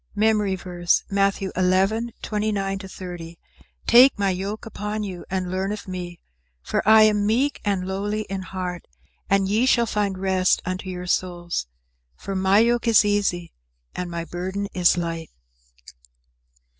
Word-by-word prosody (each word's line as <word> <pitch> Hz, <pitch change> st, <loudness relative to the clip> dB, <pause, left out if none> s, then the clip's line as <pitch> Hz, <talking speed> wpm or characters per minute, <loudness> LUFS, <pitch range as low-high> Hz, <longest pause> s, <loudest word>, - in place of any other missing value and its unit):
MEMORY 210 Hz, -2 st, +2 dB
VERSE, 175 Hz, -1 st, 0 dB
Matthew 195 Hz, -1 st, +1 dB
11: 195 Hz, +6 st, +1 dB
29 205 Hz, -2 st, -1 dB
30 175 Hz, -3 st, -8 dB, 0.5 s
"Take 250 Hz, +2 st, +7 dB
my 200 Hz, -1 st, +1 dB
yoke 195 Hz, +5 st, -4 dB
upon 210 Hz, -1 st, -4 dB
you, 185 Hz, -4 st, -6 dB
and 185 Hz, -1 st, -2 dB
learn 190 Hz, +2 st, -1 dB
of 210 Hz, -1 st, -6 dB
me; 180 Hz, -2 st, -6 dB, 0.4 s
for -, -, -1 dB
I 220 Hz, 0 st, +8 dB
am 210 Hz, -1 st, +3 dB
meek 260 Hz, +7 st, +1 dB
and 195 Hz, -3 st, -1 dB
lowly 205 Hz, +3 st, -2 dB
in 195 Hz, -1 st, -5 dB
heart: 185 Hz, -2 st, -5 dB, 0.4 s
and 195 Hz, -1 st, +3 dB
ye 220 Hz, +6 st, +2 dB
shall 235 Hz, -2 st, +4 dB
find 205 Hz, -3 st, -1 dB
rest 185 Hz, -1 st, +2 dB
unto 185 Hz, +1 st, -4 dB
your 180 Hz, -1 st, -5 dB
souls. 175 Hz, -, -2 dB, 0.5 s
For 195 Hz, -, -6 dB
my 190 Hz, +1 st, +3 dB
yoke 235 Hz, +2 st, +3 dB
is 220 Hz, -2 st, +6 dB
easy 200 Hz, -4 st, 0 dB, 0.4 s
and 180 Hz, -1 st, -4 dB
my 170 Hz, -1 st, -4 dB
burden 185 Hz, +4 st, -4 dB
is 180 Hz, 0 st, +3 dB
light." 165 Hz, -2 st, -3 dB
195 Hz, 145 wpm, -23 LUFS, 180-210 Hz, 0.5 s, I